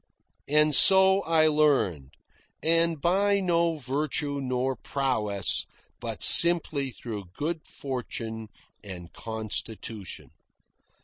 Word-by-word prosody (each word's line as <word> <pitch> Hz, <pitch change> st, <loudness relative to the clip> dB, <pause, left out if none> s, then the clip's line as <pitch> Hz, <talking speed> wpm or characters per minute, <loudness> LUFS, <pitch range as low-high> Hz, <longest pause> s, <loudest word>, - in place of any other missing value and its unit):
And 150 Hz, +1 st, +2 dB
so 190 Hz, +4 st, +6 dB
I 160 Hz, -1 st, +2 dB
learned; 135 Hz, -, 0 dB, 0.5 s
and 165 Hz, -1 st, +1 dB
by 200 Hz, +5 st, +1 dB
no 170 Hz, -3 st, 0 dB
virtue 145 Hz, +1 st, -3 dB
nor 130 Hz, 0 st, -3 dB
prowess, 105 Hz, -, -1 dB, 0.3 s
but -, -, -6 dB
simply 160 Hz, -5 st, +5 dB
through 110 Hz, -5 st, -8 dB
good 160 Hz, +1 st, -5 dB
fortune 115 Hz, -4 st, -7 dB, 0.4 s
and 90 Hz, -4 st, -11 dB
constitution. 110 Hz, -2 st, -7 dB
140 Hz, 90 wpm, -25 LUFS, 110-165 Hz, 0.5 s, so